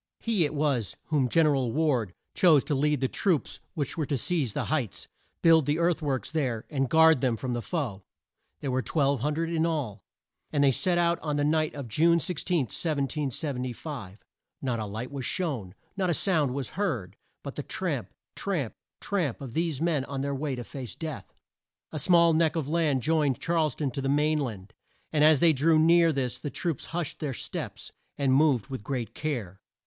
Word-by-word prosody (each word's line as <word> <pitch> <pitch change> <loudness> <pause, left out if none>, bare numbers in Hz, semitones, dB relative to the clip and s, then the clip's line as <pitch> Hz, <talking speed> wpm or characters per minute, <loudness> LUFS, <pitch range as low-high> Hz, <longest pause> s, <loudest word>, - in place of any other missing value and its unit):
He 215 -8 +2
it 150 - -3
was 140 -7 0
whom 140 -5 +2
Gen 165 +5 +4
er 150 -2 +3
al 130 -4 0
Ward 125 - 0 0.2
chose 160 -7 +5
to 150 - -2
lead 145 0 +1
the 130 - +2
troops 175 +1 0 0.2
which 145 +1 -3
were 155 - +1
to 140 - 0
seize 140 - 0
the - - -2
heights, 135 - -2 0.4
build 165 -4 +6
the 145 +1 +2
earth 170 0 +1
works 140 -4 -2
there, 130 -8 -1
and 135 -3 0
guard 160 -3 +6
them 125 -4 +1
from 125 +2 -3
the 120 - -2
foe. 125 - -3 0.6
There 140 - -2
were 130 +1 +1
1200 150 +5 0
in 165 -1 +1
all, 140 - -2 0.5
and 145 -2 +2
they 140 - +6
set 175 +6 0
out 170 0 +2
on 150 -2 -2
the 145 - +1
night 155 +1 +1
of 140 -4 -6
June 170 +9 +3
16, 175 0 0
1775. 135 - -3 0.4
Not 125 -3 -2
a 110 - -3
light 110 +6 -5
was 140 -2 -5
shown. 125 - -2 0.2
Not 190 -2 0
a 170 - +2
sound 150 -9 +1
was 140 -3 -2
heard, 125 - -2 0.3
but - - -6
the - - -4
tramp - - -3 0.2
tramp 165 - -2 0.3
tramp 175 - -1
of 130 -4 -8
these 165 -3 -1
men 165 -5 +1
on 135 -1 -4
their 140 0 -1
way 140 0 -2
to 120 - -5
face 125 0 -7
death. 155 -5 -6 0.6
A 155 - -3
small 170 +2 +5
neck 160 0 +2
of 160 -4 -1
land 150 -5 +1
joined 150 -4 +2
Charles 165 -5 +1
town 145 -4 -2
to 135 - -4
the 135 - -1
main 150 +2 +2
land, 110 -7 -5 0.4
and 150 -1 +3
as 155 -2 +6
they 170 -2 +6
drew 155 +3 +3
near 165 +1 +5
this 130 -4 -2
the 145 - -4
troops 165 0 -3
hushed 170 -3 -3
their 140 -4 -3
steps, - - -5 0.3
and 135 -2 +2
moved 135 -6 +3
with 130 -6 -6
great 120 0 -3
care. 115 - -4
145 Hz, 195 wpm, -28 LUFS, 130-160 Hz, 0.6 s, build